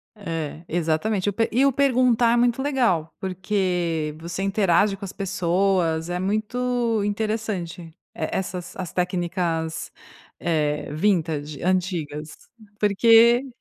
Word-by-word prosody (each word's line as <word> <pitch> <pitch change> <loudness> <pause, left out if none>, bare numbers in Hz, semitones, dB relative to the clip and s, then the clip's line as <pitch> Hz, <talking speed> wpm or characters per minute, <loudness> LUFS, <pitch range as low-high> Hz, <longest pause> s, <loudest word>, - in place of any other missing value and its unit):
É, 165 -5 -5
exatamente 175 +5 0
eu 205 - +1
pe 225 +2 +1
e 260 +5 +3
o 275 - +4
perguntar, 250 -3 +3
é - - +3
muito 240 +2 +2
legal, 240 - +1
porque 180 -5 -1
você 170 +3 -5
interage 195 0 +2
com 200 - -7
as 190 - -8
pessoas 180 -3 0
é 180 0 -2
muito 230 +2 0
interessante 205 -4 -2
e 165 -1 -13 0.3
essas 180 +2 -3
as 180 -4 -5
técnicas, 175 -2 -2 0.5
eh, 150 -3 -1
vintage, 155 -4 0
antigas, 170 -5 -1 0.5
porque 230 +5 +5
185 Hz, 120 wpm, -23 LUFS, 165-220 Hz, 0.5 s, porque